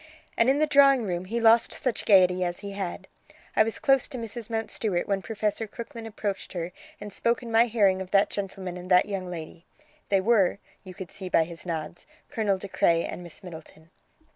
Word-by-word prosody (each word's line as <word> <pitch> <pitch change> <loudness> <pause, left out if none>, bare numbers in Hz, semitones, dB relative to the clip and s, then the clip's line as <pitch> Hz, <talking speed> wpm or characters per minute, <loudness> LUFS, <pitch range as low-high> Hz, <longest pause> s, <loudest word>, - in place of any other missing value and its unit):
And 230 - +3
in 275 - +3
the 310 - +3
drawing 275 -4 +5
room 180 -3 -3
he 230 +5 -2
lost 230 0 +5
such 250 -4 -2
gaiety 185 -2 +5
as 175 0 -3
he 200 -1 -6
had. 195 -3 -5 0.5
I - - +5
was 220 0 +1
close 270 -2 +3
to 265 - -7
Mrs. 230 -1 -6
Mountstuart 220 -4 -1
when 195 -1 0
Professor 215 +1 -2
Crooklyn 230 +1 -8
approached 205 -3 -4
her 175 -1 -4 0.3
and 205 -1 -8
spoke 235 +4 0
in 230 - -7
my 230 +2 +5
hearing 200 -5 +2
of 185 - -7
that 200 +1 +3
gentleman 190 -2 -5
and 180 +1 -9
that 180 -1 +5
young 195 -3 -4
lady. 165 -1 -8 0.5
They 195 - +3
were, 200 -2 +3 0.3
you 185 -2 -11
could 190 -2 -8
see 190 -2 -6
by 165 - +4
his 170 +2 -8
nods, 165 0 -5 0.2
Colonel 205 -4 0
De 200 - -7
Craye 170 -3 +2
and - - -6
Miss 175 +2 -11
Middleton." 160 -1 -12
200 Hz, 205 wpm, -26 LUFS, 180-225 Hz, 0.5 s, drawing